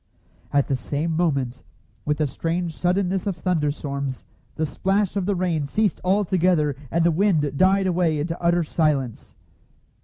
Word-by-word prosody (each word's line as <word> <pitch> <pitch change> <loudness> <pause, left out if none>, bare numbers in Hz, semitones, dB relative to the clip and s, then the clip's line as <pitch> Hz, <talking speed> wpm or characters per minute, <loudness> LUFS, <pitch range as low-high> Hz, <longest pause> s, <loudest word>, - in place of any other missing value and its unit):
At 140 -1 +2
the 135 - +1
same 150 +5 -2
moment, 140 -7 0 0.4
with 150 0 0
the 155 - +1
strange 165 +4 -2
suddenness 185 +1 0
of 195 - -1
thunderstorms, 145 -6 -2 0.3
the 160 - 0
splash 195 +5 0
of 195 -2 -1
the 200 - +1
rain 170 -5 0
ceased 210 +7 0
altogether, 180 -6 +2
and 170 +4 +1
the 170 - +4
wind 160 -6 +1
died 190 +4 +3
away 175 -4 +1
into 165 +3 -3
utter 170 0 +3
silence. 145 -7 -1
165 Hz, 150 wpm, -23 LUFS, 145-185 Hz, 0.4 s, the